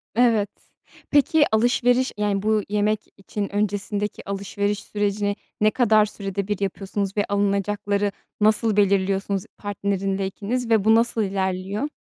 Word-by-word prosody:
Evet. 225 -4 +3 0.6
Peki, 295 +1 +4
alışveriş, 245 +3 +3
yani, 205 -1 0
bu 215 0 +1
yemek 210 +1 +1 0.2
için 200 +1 -5
öncesindeki 205 0 -2
alışveriş 200 +1 -2
sürecini 205 0 -1 0.3
ne 215 0 +5
kadar 215 -4 +4
sürede 200 -2 -4
bir 205 -2 -2
yapıyorsunuz 195 0 -3
ve 205 - +2
alınacakları 200 0 0 0.3
nasıl 215 0 +3
belirliyorsunuz 195 -1 +2
partnerinle 195 -1 -2
ikiniz 230 +5 -3
ve 220 -3 +4
bu 220 0 +6
nasıl 230 -1 +2
ilerliyor? 195 +5 -2
205 Hz, 125 wpm, -23 LUFS, 200-215 Hz, 0.6 s, bu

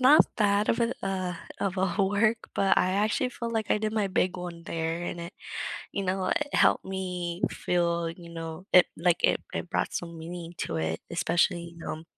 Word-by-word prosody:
not 275 +4 +8
bad 205 -1 +3
of 230 - +2
a, 235 +1 +2
uh 185 -2 -1 0.3
of 195 -1 0
a 185 -2 +1
work, 215 +3 +3 0.2
but 195 - +4
I 185 - +3
actually 215 +5 +1
feel 235 -1 -4
like 220 -2 -1
I - - +4
did 215 0 -1
my 210 -3 +1
big 185 -1 +1
one 175 -2 -7
there, 165 +1 -2
and 170 - -4
it, 170 +3 -7 0.6
you 200 - -1
know, 185 0 0
it 295 -1 0
helped - - +4
me 180 -2 -3
feel 170 -1 0
you 170 0 -10
know, 165 +2 -6
it 180 - +8
like, 170 +1 +3
it - - +4
it 180 - -3
brought - - 0
some 170 -1 -4
meaning 170 +1 -7
to - - -3
it, 80 0 -1
especially, 170 +1 +2
you 170 - -16
know 160 -1 -5
180 Hz, 200 wpm, -28 LUFS, 170-200 Hz, 0.6 s, not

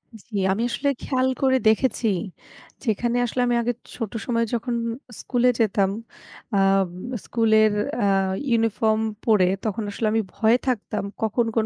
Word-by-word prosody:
জি, 220 +1 -12 0.2
আমি 215 +4 0
আসলে 280 +4 0
খেয়াল 260 -1 0
করে 260 -1 +4
দেখেছি, 230 +1 +2 0.8
যেখানে 240 +1 0
আসলে 245 +2 -2
আমি 240 - +2
আগে 240 +1 0 0.2
ছোট 225 -5 -4
সময়ে 230 -2 +1
যখন 235 +1 -1 0.5
স্কুলে 250 0 +2
যেতাম 200 -3 +2 0.7
আম 195 -1 +3 0.4
স্কুলের 220 -2 +3 0.3
আ - - +3 0.4
ইউনিফর্ম 225 -1 +2 0.3
পরে 210 -5 +4 0.2
তখন 215 +1 -2
আসলে 215 +2 -1
আমি 225 - +2
ভয়ে 225 +2 +3
থাকতাম 215 -4 -1 0.2
কখন 225 +2 +1
কোন 225 -2 +2
225 Hz, 140 wpm, -23 LUFS, 215-240 Hz, 0.8 s, করে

